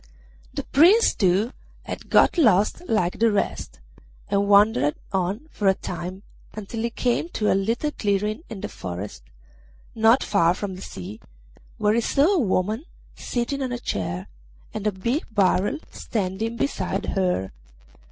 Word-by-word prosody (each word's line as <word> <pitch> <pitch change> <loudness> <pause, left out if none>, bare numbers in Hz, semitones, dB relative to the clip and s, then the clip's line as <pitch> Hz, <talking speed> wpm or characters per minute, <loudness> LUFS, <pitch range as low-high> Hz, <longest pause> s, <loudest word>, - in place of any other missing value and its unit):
The - - -4
Prince, 360 - +5
too, 195 +5 +2 0.3
had - - -7
got - - +5
lost 215 - +3
like 180 -5 +1
the 230 0 +4
rest, 205 - -2 0.5
and 200 0 +1
wandered 200 - +4 0.2
on 190 +3 0
for 205 - -1
a 190 - +5
time 185 +2 -6 0.3
until 215 +2 -5
he 235 - 0
came 245 +7 -1
to 210 - +1
a - - +4
little 230 +10 0
clearing 210 +1 -1
in 200 -4 -7
the - - -3
forest 90 -3 -7 0.7
not 225 +3 +4
far 175 -4 +3
from 200 0 -4
the 185 - -9
sea, 100 - -8 0.6
where 210 0 +2
he 235 - +2
saw 290 - +3
a 375 - +2
woman 215 - 0 0.3
sitting 255 +3 -3
on 260 -2 -2
a 245 - -2
chair 90 - -3 0.5
and 215 0 -2
a - - +2
big 235 - -1
barrel 200 +5 +2
standing 215 +2 -3
beside 195 -7 -2
her. 180 - 0
205 Hz, 150 wpm, -24 LUFS, 185-235 Hz, 0.7 s, Prince